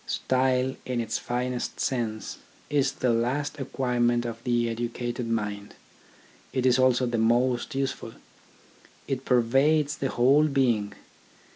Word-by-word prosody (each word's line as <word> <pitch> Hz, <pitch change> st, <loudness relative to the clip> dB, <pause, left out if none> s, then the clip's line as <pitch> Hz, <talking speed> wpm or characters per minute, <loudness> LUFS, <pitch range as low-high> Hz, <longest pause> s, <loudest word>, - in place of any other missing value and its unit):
Style, 130 Hz, 0 st, +1 dB
in 125 Hz, -2 st, -2 dB
its 115 Hz, -1 st, -2 dB
finest 125 Hz, 0 st, -3 dB
sense, 115 Hz, -4 st, -2 dB, 0.3 s
is 140 Hz, -2 st, +2 dB
the 130 Hz, -2 st, 0 dB
last 130 Hz, +6 st, -1 dB
acquirement 120 Hz, -3 st, 0 dB
of 115 Hz, 0 st, -6 dB
the 120 Hz, -1 st, +1 dB
educated 120 Hz, +1 st, -3 dB
mind; 105 Hz, -2 st, -3 dB, 0.8 s
it 130 Hz, -1 st, -1 dB
is 130 Hz, 0 st, +4 dB
also 130 Hz, 0 st, +3 dB
the 120 Hz, -2 st, -1 dB
most 120 Hz, +3 st, +1 dB
useful. 135 Hz, -4 st, -3 dB, 0.9 s
It 135 Hz, -1 st, -3 dB
pervades 140 Hz, +5 st, +2 dB
the 135 Hz, -, -2 dB
whole 140 Hz, +6 st, +4 dB
being. 120 Hz, -8 st, +1 dB
125 Hz, 125 wpm, -26 LUFS, 120-130 Hz, 0.9 s, is